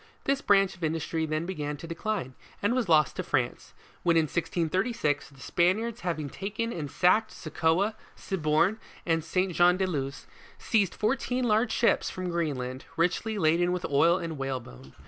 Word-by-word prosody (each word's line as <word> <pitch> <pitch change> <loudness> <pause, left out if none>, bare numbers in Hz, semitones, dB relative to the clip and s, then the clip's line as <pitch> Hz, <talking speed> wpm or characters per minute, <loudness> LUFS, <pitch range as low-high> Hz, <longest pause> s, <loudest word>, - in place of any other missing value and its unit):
This 275 0 +1
branch 195 -2 +3
of 175 - -12
in 160 0 +1
dustry 160 0 -2
then 155 +2 -1
began 150 -5 -4
to 150 - -9
decline, 165 - -3 0.3
and 205 +4 +1
was 250 -7 0
lost 155 -3 +4
to - - -1
France, - - -2 0.3
when 170 -1 +3
in 165 - +5
1636, 170 - -1
the 140 -2 -19
Spaniards 205 - 0
having 165 -4 -2
taken 215 - -4
and 150 -4 -4
sacked 200 +8 +3
Soccoa, 165 +6 0 0.2
Cibourn, 170 +4 +1 0.3
and 165 -2 +1
Saint 185 +3 0
Jean 175 +1 +5
de 190 - +1
Luz, 140 -5 -3 0.3
seized 205 -6 +1
fourteen 250 +3 0
large 225 0 +2
ships, 235 - +2
from 185 -1 -4
Green 165 -4 0
land, 130 +1 -6
richly 180 +6 0
laden 175 0 +3
with 180 0 -2
oil 165 +5 +4
and 165 -5 -5
whalebone. 120 - -6
170 Hz, 170 wpm, -28 LUFS, 155-200 Hz, 0.3 s, in